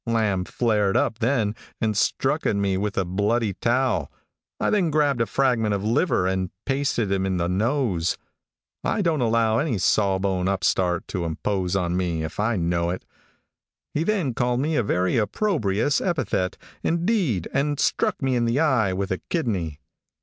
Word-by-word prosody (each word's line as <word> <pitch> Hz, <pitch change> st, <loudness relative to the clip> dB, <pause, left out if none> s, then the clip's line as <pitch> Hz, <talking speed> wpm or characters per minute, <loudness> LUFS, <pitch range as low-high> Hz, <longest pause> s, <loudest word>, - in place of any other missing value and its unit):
Lamb 105 Hz, -5 st, +1 dB
flared 105 Hz, -4 st, +1 dB
up 110 Hz, -, 0 dB
then, 115 Hz, -3 st, +1 dB, 0.3 s
and 110 Hz, -1 st, 0 dB
struck -, -, +1 dB
at -, -, +1 dB
me 100 Hz, -1 st, +1 dB
with 100 Hz, +2 st, -2 dB
a 95 Hz, -, +1 dB
bloody 105 Hz, +4 st, 0 dB
towel. 125 Hz, +4 st, 0 dB, 0.5 s
I -, -, +1 dB
then 195 Hz, -6 st, +2 dB
grabbed 145 Hz, -5 st, +2 dB
a 115 Hz, -, +1 dB
fragment 120 Hz, -6 st, +1 dB
of 100 Hz, -, -3 dB
liver, 115 Hz, -, +2 dB
and 95 Hz, -1 st, 0 dB, 0.2 s
pasted 135 Hz, -6 st, 0 dB
him 95 Hz, -1 st, +1 dB
in 95 Hz, -1 st, 0 dB
the 85 Hz, 0 st, 0 dB
nose. 100 Hz, -, 0 dB, 0.7 s
I 210 Hz, -, 0 dB
don't 160 Hz, -5 st, +1 dB
allow 115 Hz, -1 st, +2 dB
any 145 Hz, -8 st, 0 dB
sawbone 95 Hz, -2 st, +1 dB
upstart 90 Hz, -2 st, 0 dB
to 90 Hz, -4 st, -2 dB
impose 90 Hz, +3 st, -1 dB
on 90 Hz, -2 st, 0 dB
me, 85 Hz, -3 st, -1 dB
if 80 Hz, +3 st, -6 dB
I 110 Hz, +2 st, +1 dB
know 85 Hz, -1 st, 0 dB
it. 90 Hz, -, -4 dB, 0.9 s
He 155 Hz, -, 0 dB
then 180 Hz, -, 0 dB
called 125 Hz, +1 st, 0 dB
me 155 Hz, +4 st, 0 dB
a -, -, +3 dB
very 95 Hz, -1 st, +1 dB
opprobrious 115 Hz, -, +1 dB
epithet, 130 Hz, -, -1 dB, 0.2 s
indeed, 170 Hz, -, 0 dB
and 145 Hz, +1 st, 0 dB
struck -, -, 0 dB
me 130 Hz, -1 st, +1 dB
in 120 Hz, -1 st, +1 dB
the 115 Hz, +4 st, +1 dB
eye 130 Hz, -11 st, +2 dB
with 95 Hz, +1 st, -2 dB
a 95 Hz, -, -1 dB
kidney. 95 Hz, -, -2 dB
110 Hz, 170 wpm, -24 LUFS, 95-130 Hz, 0.9 s, a